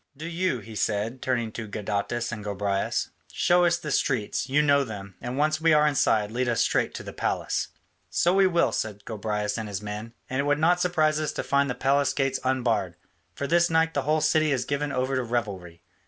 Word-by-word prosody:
Do 155 - -7
you," 170 -7 -1
he 110 +2 -11
said, 110 +4 -1
turning 120 -3 -1
to 110 0 -6
Gadatas 105 +3 -2
and 110 -3 -6
Gobryas, 100 -1 -1 0.2
"show 175 0 +3
us 170 0 +3
the 150 -3 -5
streets, 130 -1 0
you 145 +3 +3
know 140 -1 +4
them; 100 -5 -8
and 125 +2 -4
once 155 +2 +1
we 165 0 +4
are 150 0 +5
inside, 110 -8 +2
lead 125 +1 -1
us 115 - +1
straight - - +1
to - - -6
the - - -8
palace." - - -1 0.4
"So 175 - +2
we 195 0 +5
will," 170 -2 +2
said 105 -2 -4
Gobryas 105 0 -2
and 110 - -4
his 100 0 -5
men, 105 +2 -6
"and 130 - -2
it 140 - +1
would 145 0 +2
not 175 +3 +3
surprise 155 -4 +2
us 155 -2 -1
to - - -3
find 140 0 +2
the 125 - -2
palace 140 +1 +2
gates 135 -1 0
unbarred, 120 -8 0 0.4
for 140 - -3
this 170 +4 +3
night 165 0 +2
the 140 - 0
whole 155 +3 +1
city 155 0 +3
is 125 -3 0
given 145 0 -2
over 130 0 -1
to 130 - +1
revelry. 100 -8 -4
130 Hz, 215 wpm, -26 LUFS, 110-150 Hz, 0.4 s, are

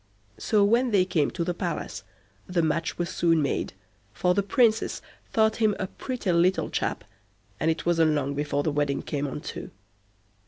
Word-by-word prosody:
So, 205 - +3
when 235 +5 +3
they 195 -4 +3
came 155 -6 +1
to 170 - -3
the 175 +1 -1
palace, 170 - -4 0.5
the 175 -2 +1
match 160 +1 -1
was 175 - -1
soon 165 -2 +2
made, 140 -9 -1 0.4
for 180 0 +2
the 200 - +2
Princess 220 +2 +2 0.3
thought 220 0 +2
him 215 -3 +2
a 190 - -2
pretty 235 0 -3
little 175 +2 +2
chap, - - -2 0.6
and 160 - +1
it 160 - -1
wasn't 165 -2 +3
long 140 -1 -1
before 145 0 -1
the 155 - 0
wedding 145 -1 0
came 145 -1 -2
on 145 +2 -5
too. - - -7
170 Hz, 180 wpm, -26 LUFS, 150-200 Hz, 0.6 s, So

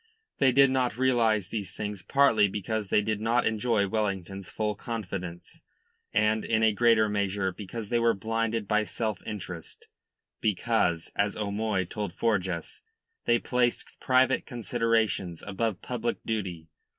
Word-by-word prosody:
They 135 -2 +5
did 135 +1 +5
not 125 -3 0
realise 115 -6 +2
these 100 -4 -4
things 105 -2 -4
partly 115 -4 +4
because 105 +2 -3
they 105 - +3
did 110 0 -1
not 115 +2 +2
enjoy 110 -2 +1
Wellington's 100 -3 -2
full 105 -1 -1
confidence, 95 -5 -6 0.5
and 105 +1 +2
in 110 -1 +1
a 110 -1 +4
greater 115 0 +4
measure 100 -2 0
because 105 +2 -7
they 120 - +2
were 115 -1 +3
blinded 115 +1 -1
by 105 0 +2
self 110 -2 -3
interest, 90 -5 -7 0.5
because, 105 -5 0
as 100 0 0
O'Moy 105 -2 -1
told 100 0 -5
Forjas, 95 -7 -1 0.4
they 120 - +4
placed 120 0 0
private 130 0 +3
considerations 115 -7 0
above 100 0 -2
public 120 -1 -2
duty. 95 -7 -3
110 Hz, 140 wpm, -28 LUFS, 100-115 Hz, 0.5 s, They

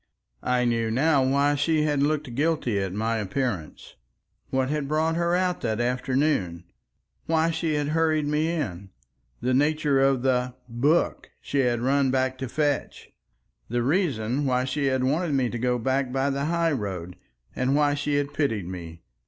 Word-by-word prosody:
I 125 0 +1
knew 115 -1 +1
now 135 +4 +3
why 140 +2 +2
she 150 +2 +1
had 145 -2 +1
looked 145 -4 0
guilty 145 -6 0
at 95 -1 -2
my 110 +3 -1
appearance, 105 - -3 0.6
what 130 -1 0
had 150 -1 -1
brought 160 +2 +1
her 170 +1 +1
out 180 0 0
that 110 -1 -1
afternoon, 125 - 0 0.6
why 165 0 +2
she 160 -1 -1
had 145 0 -1
hurried 155 -1 +1
me 150 +2 0
in, 100 - -3 0.5
the 125 +2 0
nature 150 0 +2
of 135 -2 +2
the 125 -1 +1
"book" 135 +8 +1
she 140 - -2
had 120 -3 +1
run 135 +1 +2
back 130 0 0
to 130 -2 -4
fetch, 145 0 -2 0.6
the 120 +1 0
reason 140 - 0
why 125 0 +1
she 140 +1 -1
had 130 -1 +1
wanted 150 +4 0
me 130 -3 +1
to 120 - -4
go 125 +1 +1
back 130 +2 0
by 135 +2 0
the 140 +1 -2
high 170 +1 +1
road, 95 - -4 0.4
and 130 +2 +1
why 145 -1 +3
she 145 0 -1
had 145 0 -1
pitied 115 - -1
me. 85 -2 -8
135 Hz, 170 wpm, -25 LUFS, 120-150 Hz, 0.6 s, now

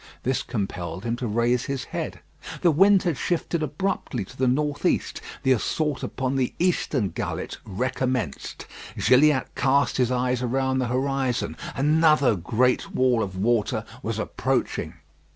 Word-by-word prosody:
This 130 +1 0
compelled 90 -6 -4
him 115 0 -1
to 120 - -3
raise 120 +3 +1
his 135 -3 -3
head. - - -5 0.4
The 170 - +5
wind 195 +5 +5
had 170 -6 0
shifted 170 -1 -1
abruptly 150 - -2
to 130 - -14
the 130 0 +1
north 145 +3 0
east. - - 0 0.2
The 130 - +3
assault 145 +4 0
upon 135 +1 -2
the 130 -2 -1
eastern 150 - +1
gullet - - -4
recommenced. 125 - -2 0.3
Gilliatt 130 +4 +4
cast 140 +2 +2
his 125 -1 +2
eyes 125 0 0
around 130 +1 0
the 125 - 0
horizon. 130 0 -1 0.2
Another 150 -3 +4
great 120 +8 0
wall 125 -3 +3
of 95 -3 -4
water 110 +2 +1 0.2
was - - -3
approaching. 80 - -1
130 Hz, 145 wpm, -25 LUFS, 120-140 Hz, 0.4 s, The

